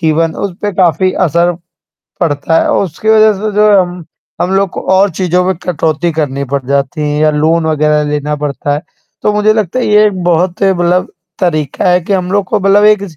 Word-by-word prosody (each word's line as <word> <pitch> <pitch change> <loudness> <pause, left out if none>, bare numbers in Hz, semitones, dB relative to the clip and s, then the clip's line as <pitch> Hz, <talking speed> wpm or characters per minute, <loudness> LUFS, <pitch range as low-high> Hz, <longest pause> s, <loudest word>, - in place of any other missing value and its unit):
जीवन 160 0 0
उस 195 - -8
पे 205 -1 -1
काफ़ी 185 0 +2
असर 170 +2 +1 0.7
पड़ता 160 0 +1
है - - 0
उसकी 190 +2 -2
वज़ह 220 0 +5
से 215 - -1
जो 210 0 +4
है 205 - +5
हम 175 -1 -5 0.4
हम 180 - 0
लोग 195 -1 +1
को - - -6
और 195 +1 +3
चीज़ों 180 0 +1
में 190 +1 0
कटौती 165 -1 -1
करनी 140 -3 -2
पड़ 140 - -1
जाती 140 +4 -1
है 150 0 -1
या 155 0 +3
लोन 160 +2 +1
वग़ैरह 150 -1 +1
लेना 150 0 -2
पड़ता 145 0 -3
है। 150 - -4 0.4
तो 210 - +1
मुझे 210 +1 +2
लगता 215 +1 -1
है - - -1
ये 210 0 +4
एक 190 -3 -2
बहुत 175 +1 0
मतलब 180 -2 +1 0.3
तरीक़ा 155 -2 -1
है 180 0 +3
कि 185 +4 -4
हम 185 -2 -1
लोग 200 -1 +1
को 210 +2 -1
मतलब 195 +2 +3
एक 210 -1 +4
175 Hz, 210 wpm, -12 LUFS, 155-195 Hz, 0.7 s, वज़ह